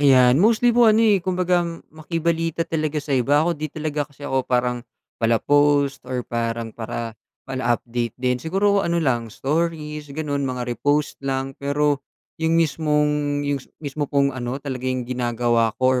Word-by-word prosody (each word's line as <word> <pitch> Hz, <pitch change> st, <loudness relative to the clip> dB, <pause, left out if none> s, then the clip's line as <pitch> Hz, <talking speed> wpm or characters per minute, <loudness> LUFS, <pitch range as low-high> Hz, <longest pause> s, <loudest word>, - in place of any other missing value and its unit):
Ayan, 130 Hz, -1 st, +6 dB
mostly 230 Hz, +4 st, +4 dB
po, 235 Hz, -1 st, +6 dB
ano, 220 Hz, +1 st, +5 dB
eh, 205 Hz, -3 st, +4 dB
kumbagang 180 Hz, -2 st, 0 dB
makibalita 165 Hz, +1 st, -1 dB
talaga 155 Hz, -2 st, -2 dB
sa 145 Hz, -1 st, -2 dB
iba. 140 Hz, +4 st, +3 dB
Ako, 175 Hz, -, +1 dB
'di 155 Hz, -1 st, -4 dB
talaga 150 Hz, -1 st, -3 dB
kasi 140 Hz, 0 st, -13 dB
ako 135 Hz, -2 st, +1 dB
parang 125 Hz, -1 st, +1 dB, 0.4 s
pala-post 140 Hz, +4 st, +3 dB
or 125 Hz, -2 st, -2 dB
parang 115 Hz, -1 st, -3 dB
para 115 Hz, 0 st, -5 dB, 0.3 s
pala 130 Hz, -3 st, 0 dB
update 120 Hz, -1 st, -4 dB
din. 125 Hz, 0 st, 0 dB
Siguro 200 Hz, +6 st, +2 dB
ano 170 Hz, -3 st, 0 dB
lang, 120 Hz, -8 st, 0 dB
stories, 150 Hz, +3 st, -2 dB
gano'n, 145 Hz, 0 st, -3 dB
mga 125 Hz, -1 st, -3 dB
repost 145 Hz, +5 st, 0 dB
lang. 135 Hz, 0 st, -2 dB
Pero 145 Hz, 0 st, +1 dB, 0.4 s
'yung 160 Hz, +1 st, +2 dB
mismong 150 Hz, -2 st, +1 dB
yung 145 Hz, -1 st, -1 dB
s -, -, -18 dB, 0.2 s
mismo 145 Hz, 0 st, -3 dB
pong 140 Hz, -1 st, +2 dB
ano, 125 Hz, 0 st, -4 dB
talaga 130 Hz, -2 st, -4 dB
'yung 130 Hz, -1 st, -1 dB
ginagawa 120 Hz, -2 st, 0 dB
ko 130 Hz, 0 st, +2 dB
145 Hz, 160 wpm, -22 LUFS, 125-155 Hz, 0.4 s, Ayan